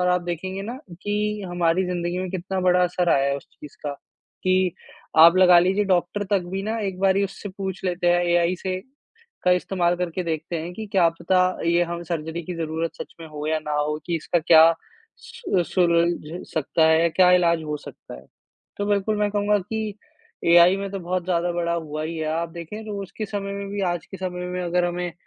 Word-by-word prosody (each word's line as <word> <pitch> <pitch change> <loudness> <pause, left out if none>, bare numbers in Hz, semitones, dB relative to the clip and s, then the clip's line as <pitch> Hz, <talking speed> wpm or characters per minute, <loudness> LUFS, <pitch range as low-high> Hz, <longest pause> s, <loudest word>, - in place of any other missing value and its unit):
और 180 - +2
आप 180 0 +2
देखेंगे 185 +3 -4
ना 235 +5 -5 0.3
कि 210 0 -1
हमारी 175 +1 +1
जिंदगी 175 0 -2
में 185 -1 -3
कितना 185 +1 -3
बड़ा 180 0 +3
असर 180 0 0
आया 140 0 +3
है 140 - 0
उस - - -11
चीज़ 150 - -13
का, 145 - -1
कि 185 +4 -2 0.5
आप 170 +3 +9
लगा 180 -2 +7
लीजिए 190 +4 +2
डॉक्टर 190 +2 0
तक 195 -3 +2
भी 195 0 -2
ना 220 +2 -2
एक 190 -3 -3
बारी 195 +1 +3
उससे 200 +1 -7
पूछ 190 0 -6
लेते 180 -1 -1
हैं 175 0 +4
एआई 175 +1 +2
से 185 -1 -2 0.6
का 180 - +4
इस्तेमाल 180 -1 +1
करके 180 0 -2
देखते 160 +1 -3
हैं 170 +3 -6
कि 220 -1 -6
क्या 180 -4 +5
पता 185 +1 +2 0.3
ये 170 +1 +3
हम 170 0 -5
सर्जरी 160 0 -4
की 180 +2 -6
ज़रूरत 160 0 -3
सच - - -15
में 165 - -8
हो 150 -1 -6
या 155 0 +1
ना 150 -1 -5
हो 150 +1 0
कि 170 -1 0
इसका 175 +2 0
क्या 160 0 +7 0.6
सु 470 - -3
अ, - - +3
सुलझ 170 -1 0
सकता 160 +1 +2
है, 160 +1 +4
क्या 180 +1 +5
इलाज 170 -2 +3
हो 150 -1 -3
सकता 145 - -11
है। 60 - -13 0.5
तो 205 - -1
बिल्कुल 205 +1 +1
मैं 210 -1 +1
कहूँगा 205 0 +2
कि 215 +2 -4 0.5
एआई 175 +2 +7
में 195 0 -4
तो 195 0 -5
बहुत 180 0 -2
ज़्यादा 175 -1 0
बढ़ा 170 0 -1
हुआ 155 -2 -4
ही 165 +1 -4
है। 155 - -3
आप 165 +1 -1
देखें 170 +6 -8
तो 205 -1 -4
उसके 210 +3 -6
समय 200 -1 -4
में 200 0 -5
भी 200 0 -4
आज 175 - -6
के 195 - -9
समय 180 -1 -4
में 180 0 -4
अगर 175 0 +1
हमें 175 0 -3
180 Hz, 215 wpm, -23 LUFS, 170-190 Hz, 0.6 s, आप